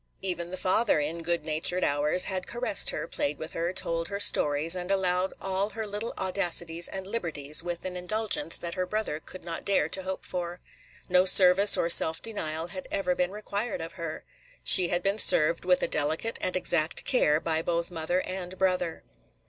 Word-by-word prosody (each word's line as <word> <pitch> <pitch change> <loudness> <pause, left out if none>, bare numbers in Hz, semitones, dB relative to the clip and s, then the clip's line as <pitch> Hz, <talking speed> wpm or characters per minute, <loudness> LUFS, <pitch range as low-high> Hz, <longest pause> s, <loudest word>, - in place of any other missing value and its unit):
Even 175 -2 -2
the 185 - -6
father, 190 -1 +1
in 155 +3 -3
good 170 -1 -1
natured 160 +4 +1
hours, 150 +5 +2
had 185 -2 -4
caressed 240 -4 +1
her, - - -3
played 145 +1 -2
with 160 - -7
her, 170 +1 -2
told 165 -2 -2
her 200 +2 -5
stories, 150 -3 +4
and 180 0 -4
allowed 185 -1 +1
all 195 +1 -1
her 220 +1 -5
little 210 +3 -4
audacities 175 -3 +1
and 190 -1 -7
liberties 160 -8 -1
with 175 0 -6
an 185 -1 -4
indulgence 215 +10 -1
that 170 -1 -6
her 185 -1 -3
brother 210 -6 -3
could 175 +3 -11
not 165 -1 -6
dare 195 -7 +1
to 190 - -3
hope 190 0 -6
for. 175 -1 -5 0.5
No 180 0 +3
service 190 +2 +7
or - - 0
self 160 -1 +5
denial 165 -7 -4
had 185 +1 -8
ever 185 -2 -1
been 180 0 -1
required 210 +2 -5
of 165 +1 -7
her. 165 -3 -7 0.4
She 180 - +5
had 175 +1 -2
been 200 +2 0
served, 165 -1 +3
with 180 0 +2
a - - +1
delicate 155 +9 -2
and 185 - -2
exact 170 -3 +1
care, 155 - +2
by 160 -1 -2
both 170 +1 -2
mother 175 +2 -2
and 185 0 -6
brother. 180 -3 -1
180 Hz, 190 wpm, -27 LUFS, 165-190 Hz, 0.5 s, service